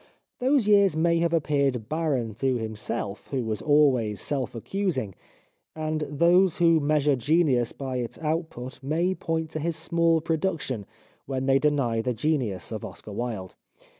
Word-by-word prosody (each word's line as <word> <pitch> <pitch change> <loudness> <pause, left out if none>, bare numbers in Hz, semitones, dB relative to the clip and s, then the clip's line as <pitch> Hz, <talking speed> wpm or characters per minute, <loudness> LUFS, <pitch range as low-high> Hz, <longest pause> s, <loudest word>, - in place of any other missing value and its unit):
Those 260 -3 +2
years 200 -6 +5
may 170 +1 +3
have 170 0 +1
appeared 140 -7 +1
barren 145 -8 -1
to 130 +4 0
himself, 105 -2 -4
who 135 -3 -2
was 110 -1 -2
always 130 -9 +3
self 135 -1 -2
accusing; 130 - -2 0.6
and 155 0 -2
those 170 +4 +4
who 165 -2 +4
measure 150 -1 +2
genius 130 -2 +2
by 130 -2 -4
its 120 -2 -4
output 155 -5 -4
may 165 +7 0
point 160 -3 -3
to 155 - -3
his 165 +2 -1
small 165 0 +2
production 155 - -2 0.4
when 130 -1 -2
they 135 0 +4
deny 135 -6 +1
the 125 +1 -2
genius 125 -8 -1
of 110 -2 -5
Oscar 105 - -9
Wilde. 105 -4 -4
145 Hz, 150 wpm, -26 LUFS, 120-165 Hz, 0.6 s, years